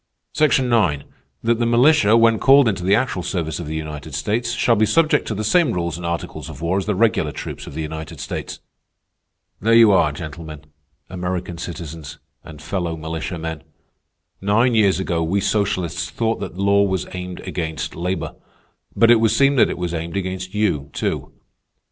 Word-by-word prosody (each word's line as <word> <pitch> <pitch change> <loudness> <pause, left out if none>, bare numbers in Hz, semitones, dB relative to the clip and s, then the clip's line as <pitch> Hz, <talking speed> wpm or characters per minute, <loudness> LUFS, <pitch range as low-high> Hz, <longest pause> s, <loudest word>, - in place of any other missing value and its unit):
"'Section 140 -4 +3
Nine, 95 -13 +2 0.4
that 115 0 +1
the 120 - +1
militia, 120 -2 +5
when 115 -1 +4
called 135 -1 +6
into 95 -5 -1
the 95 +3 +4
actual 120 -5 -1
service 85 -3 -3
of 85 - -6
the 80 - -4
United 75 -2 -6
States, 110 - -1
shall 120 0 +2
be 110 - +2
subject 155 +5 +2
to 110 - -2
the 105 - -3
same 165 +9 +3
rules 85 -1 -2
and 85 0 -5
articles 85 0 -4
of 70 - -9
war 85 +4 0
as 95 - -5
the 105 - 0
regular 110 +3 +2
troops - - -7
of - - -9
the 80 - -3
United 80 0 -7
States.' - - -5 1.0
"There 115 +3 +3
you 115 -2 +7
are 95 -6 +3
gentlemen, 75 0 -8 0.4
American 90 -2 -4
citizens, 80 -4 -7 0.3
and 80 -2 -12
fellow 85 -3 -3
militiamen. 80 0 -5 0.8
Nine 110 +5 +2
years 100 -4 +3
ago 85 -3 -1
we 85 +5 0
socialists 100 -4 -1
thought 115 -1 -1
that - - -6
law 100 +1 +3
was 95 -2 0
aimed 90 0 -6
against 80 -5 -4
labor. 90 +3 -3 0.6
But 115 0 +5
it 120 - +6
would 110 0 +3
seem 140 +5 +3
that - - +5
it - - -4
was 90 -1 -3
aimed 85 +3 -4
against 95 0 -4
you, 80 -10 0
too. - - -3
95 Hz, 180 wpm, -21 LUFS, 80-110 Hz, 1.0 s, you